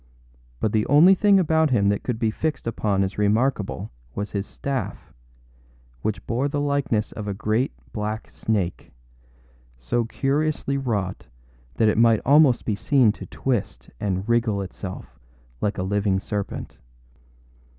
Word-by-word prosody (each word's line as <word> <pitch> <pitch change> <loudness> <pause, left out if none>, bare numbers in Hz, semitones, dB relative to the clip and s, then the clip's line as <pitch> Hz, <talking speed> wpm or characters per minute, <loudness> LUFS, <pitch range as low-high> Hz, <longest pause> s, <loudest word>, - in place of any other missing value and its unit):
But 110 - 0
the 110 0 +1
only 155 +7 +7
thing 200 0 +4
about 160 -3 +3
him 100 -6 +3
that 100 - 0
could 125 -3 -2
be 110 -1 0
fixed 155 +5 -3
upon 105 -4 0
as 95 +2 -3
remarkable 105 - 0 0.2
was 105 +1 -4
his 100 -1 -3
staff, 140 -2 -4 0.9
which 105 +3 -3
bore 125 +4 0
the 145 0 -2
likeness 140 -7 0
of 105 -2 -6
a 100 - -2
great 110 +5 0 0.2
black 105 +1 -3
snake, 100 -5 -2 0.9
so 115 - -1
curiously 140 +3 -1
wrought 105 -9 -2 0.5
that 110 - +3
it 105 - +2
might 115 -2 +5
almost 140 -2 +5
be 110 - 0
seen 125 +1 +3
to - - -10
twist 105 - -3
and 95 0 -2
wriggle 115 -4 +1
itself 95 -8 -8 0.4
like 105 - -1
a 90 - -1
living 100 0 +1
serpent. 100 0 -5
110 Hz, 145 wpm, -24 LUFS, 100-135 Hz, 0.9 s, only